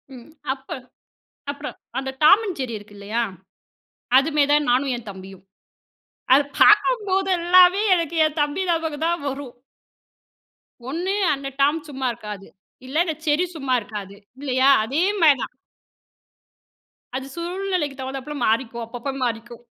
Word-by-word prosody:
ம். 245 +4 -13 0.2
அப்போ 270 0 -8 0.8
அப்புறம், 285 +1 -7 0.2
அந்த 265 0 -4
Tom 350 +7 +8
and 380 - -2
Jerry 250 -3 -3
இருக்கு 205 0 -14
இல்லையா? 215 +4 -2 1.0
அதுமே 295 +1 +2
தான் 295 -3 +3
நானும் 260 +1 +2
என் 230 -3 -10
தம்பியும். 190 0 -11 0.9
அது 285 +1 +5 0.2
பார்க்கும்போதேல்லாமே 380 -3 +5
எனக்கு 335 -1 -2
என் 310 0 -1
தம்பி 295 +6 -1
ஞாபகம் 320 -2 -1
தான் 345 0 0
வரும். 270 -2 -6 1.3
ஒண்ணு 350 +7 -2 0.2
அந்த 275 0 -5
டாம் 295 +4 +3
சும்மா 265 -2 -3
இருக்காது, 210 -3 -9 0.4
இல்ல 285 +4 -3
இந்த 320 -3 -2
ஜெர்ரி 305 +4 +2
சும்மா 270 -4 -2
இருக்காது. 205 -2 -8 0.3
இல்லையா? 265 -1 +2
அதே 275 +9 -1 0.2
மாரி 295 -4 +6
தான். - - -7 1.6
அது 265 +1 -4
சூழ்நிலைக்கு 350 -4 -2
தகுந்தப்பல 270 +2 -6
மாறிக்கும், 235 +1 0
அப்பப்போ 245 +4 -5
மாறிக்கும். 235 0 -5
280 Hz, 130 wpm, -22 LUFS, 240-335 Hz, 1.6 s, Tom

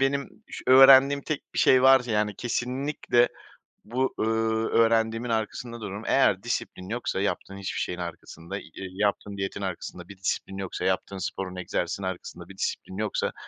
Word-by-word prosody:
benim 140 +1 +1 0.2
ş - - -8
öğrendiğim 135 +2 +8
tek 155 0 -5
bir - - -2
şey 130 -1 +5
varsa, 130 -2 +6
yani, 105 -1 +1
kesinlikle 125 +1 0 0.6
bu, 130 +4 -1
ııı, 110 0 +1
öğrendiğimin 115 +1 +2
arkasında 115 +1 -3
dururum. 100 0 -6
Eğer 100 -8 +3
disiplin 115 -5 -4
yoksa 115 -3 -2
yaptığın 100 -1 -3
hiçbir 100 -1 -4
şeyin 90 - -3
arkasında, 85 -1 -7
y - - -9
yaptığın 100 +2 -2
diyetin 95 +1 -4
arkasında 90 -1 -6
bir 100 - -12
disiplin 95 0 -3
yoksa, 95 -2 -4
yaptığın 100 - -1
sporun, 95 0 -4
egzersizin 90 +1 -3
arkasında 90 -1 -6
bir 95 - -12
disiplin 95 - -3
yoksa, 105 +1 -1
110 Hz, 155 wpm, -26 LUFS, 95-125 Hz, 0.6 s, öğrendiğim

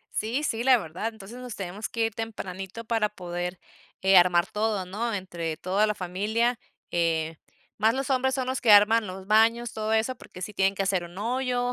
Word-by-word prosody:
Sí, 235 +7 -1
sí, 230 -6 -1
la 260 0 +6
verdad, 175 +4 -4
entonces, 220 +3 -11
nos 250 -3 -7
teníamos 195 +2 -5
que 230 -1 -1
ir 225 - -6
tempranito 195 -1 -6
para 225 -2 +1
poder, 180 -2 -5 0.4
eh, 190 0 +5
armar 175 0 +4
todo, 210 -2 -1
¿no?, 225 +6 -3
entre 170 -4 -4
toda 195 +4 +1
la 210 - 0
familia. 210 +6 0 0.3
Eh, 165 -2 0 0.4
más 220 +2 +3
los 270 0 -2
hombres 265 0 +2
son 260 -1 -1
los 260 0 -2
que 230 - +3
arman 210 +2 +7
los 190 +1 -8
baños, 225 +3 +3
todo 215 0 -2
eso, 220 +4 +1
porque 185 -6 -12
sí 210 - -5
tienen 195 -1 +2
que 195 - -1
hacer 190 -2 +1
un 175 +1 -12
hoyo 245 +2 -1
210 Hz, 200 wpm, -26 LUFS, 185-230 Hz, 0.4 s, arman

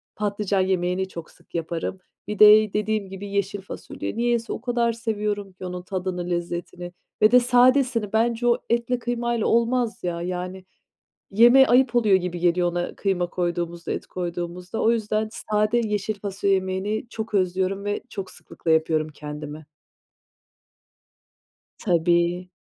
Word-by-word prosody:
Patlıcan 205 -2 0
yemeğini 185 0 0
çok 170 -3 -9
sık - - -19
yaparım. 170 +3 -3 0.3
Bir 210 -1 -5
de 215 -1 +8
dediğim 210 -2 -1
gibi 195 +1 -7
yeşil 200 0 -2
fasulye. 200 - -7
Niyeyse, 235 -1 0
o - - -6
kadar 240 -2 +1
seviyorum 210 -3 -3
ki 185 - -9
onun 180 0 -5
tadını, 180 -1 -4
lezzetini 175 +1 -4 0.3
ve 215 +2 +6
de 250 - +8
sadesini. 245 -3 +3
Bence 235 +2 +1
o 235 - +4
etle, 235 +1 0
kıymayla 240 -1 -1
olmaz 235 0 +1
ya, 170 -1 -2
yani, 180 +1 -5 0.7
yemeğe 240 +6 +7
ayıp 250 0 +4
oluyor 210 -5 +5
gibi 180 -1 -3
geliyor 175 0 +2
ona 175 0 -3
kıyma 185 -3 0
koyduğumuzda, 175 -1 -3
et - - -5
koyduğumuzda. 175 +2 -5
O 225 - +4
yüzden 215 -1 0
sade 215 +2 0
yeşil 210 -1 -1
fasulye 200 0 -1
yemeğini 190 +4 -2
çok 220 -1 -6
özlüyorum 190 +1 0
ve 205 0 -1
çok 195 -2 -6
sıklıkla 165 - -6
yapıyorum 160 -1 +2
kendime. 150 0 -8 2.1
Tabii. 175 0 +1
195 Hz, 140 wpm, -24 LUFS, 180-225 Hz, 2.1 s, de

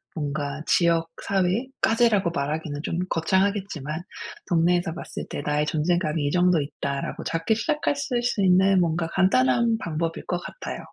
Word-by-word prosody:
뭔가 145 -1 -3
지역 165 -1 +2
사회까지라고 210 0 +1
말하기는 145 0 -3
좀 170 - -2
거창하겠지만 190 -3 0 0.5
'동네에서 175 0 +2
봤을 170 - -7
때 - - -4
나의 150 0 +1
존재감이 155 -1 0
이 145 - 0
정도 180 0 +3
있다.'라고 140 -1 -4
작게 165 +6 0
시작하실 285 -1 -1
수 230 -4 0
있는 190 +1 +5
뭔가 165 0 0
간단한 190 - +3
방법일 165 -3 -3
것 175 - -2
같아요. - - -7
170 Hz, 340 characters per minute, -25 LUFS, 155-195 Hz, 0.5 s, 있는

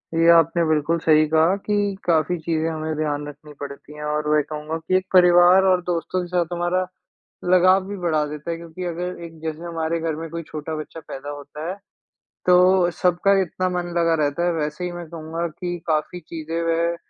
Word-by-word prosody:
ये 165 +1 +4
आपने 165 0 +4
बिल्कुल 155 +1 +1
सही 155 -1 +4
कहा 160 +4 +4
कि 210 - 0 0.3
काफ़ी 170 +1 +2
चीज़ें 160 -1 0
हमें 155 0 -3
ध्यान 150 -1 -2
रखनी 150 +1 -11
पड़ती 145 +1 -8
हैं 150 - -8
और 150 0 -1
मैं 150 0 +4
कहूँगा 155 +2 -5
कि 165 +3 -1
एक 185 - -3
परिवार 180 +1 +7
और 180 - +2
दोस्तों 175 +2 -1
के 175 - -5
साथ 175 -1 +1
हमारा, 175 +1 0 0.6
लगाव 185 +1 +4
भी 200 0 -5
बढ़ा 160 -4 0
देता 150 +2 -6
है। 165 - -3
क्योंकि 170 +2 -8
अगर 175 +1 -4
एक 165 -1 -12
जैसे 160 +1 -5
हमारे 165 -1 -2
घर 160 -1 -2
में 165 +1 -6
कोई 170 0 -5
छोटा 155 +1 -5
बच्चा 155 +1 -7
पैदा 135 +2 -7
होता 145 +3 -7
है, 185 - -3 0.7
तो 180 0 +5
सबका 180 +3 +2
इतना 185 +1 -2
मन 180 -1 -2
लगा 165 -1 +3
रहता 145 +4 0
है। - - +2
वैसे 150 +1 -3
ही 180 - -3
मैं 175 -1 -7
कहूँगा 165 +1 -4
कि 175 +2 -5
काफ़ी 155 +2 -1
चीज़ें 165 0 -5
वह, 165 +1 +1
165 Hz, 200 wpm, -22 LUFS, 155-175 Hz, 0.7 s, परिवार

